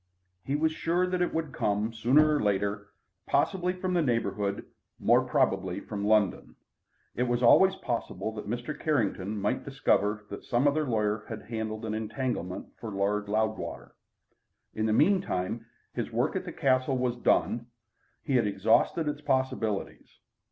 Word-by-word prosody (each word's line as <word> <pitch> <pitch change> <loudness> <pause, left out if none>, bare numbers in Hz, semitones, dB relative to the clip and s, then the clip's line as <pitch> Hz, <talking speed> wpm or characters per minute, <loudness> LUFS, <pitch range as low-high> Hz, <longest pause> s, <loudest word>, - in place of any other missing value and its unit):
He 140 - -1
was 160 +2 +2
sure 170 +3 0
that 180 0 -1
it 180 - +1
would 160 -3 -2
come 105 +2 0
sooner 145 +7 +4
or - - 0
later, 100 0 0 0.4
possibly 180 -2 +1
from 185 0 -3
the 175 - +3
neighbourhood, 105 -6 -1 0.3
more - - +4
probably 95 -1 0
from 100 0 -4
London. 105 -3 +2 0.6
It 125 +1 0
was 120 0 0
always 190 +10 +6
possible 115 -2 -3
that 105 -2 -7
Mr. 120 +6 -3
Carrington 105 -8 0
might 105 +6 -1
discover 105 -6 0
that 100 - -7
some 120 +4 +2
other 150 +2 +2
lawyer 105 -2 0
had 110 -2 -6
handled 110 -1 -4
an 110 - -3
entanglement 110 -4 -3
for 115 - -6
Lord 100 +1 -1
Loudwater. 110 +1 -2 0.8
In 110 0 -1
the - - +1
meantime, 115 - +1 0.3
his - - -3
work - - 0
at - - -2
the - - -5
Castle 130 0 +1
was 125 -1 0
done. 120 -1 +1 0.6
He 135 - +2
had 115 -3 +2
exhausted 110 - +2
its 150 0 -3
possibilities. 130 -7 -2
115 Hz, 155 wpm, -28 LUFS, 105-140 Hz, 0.8 s, always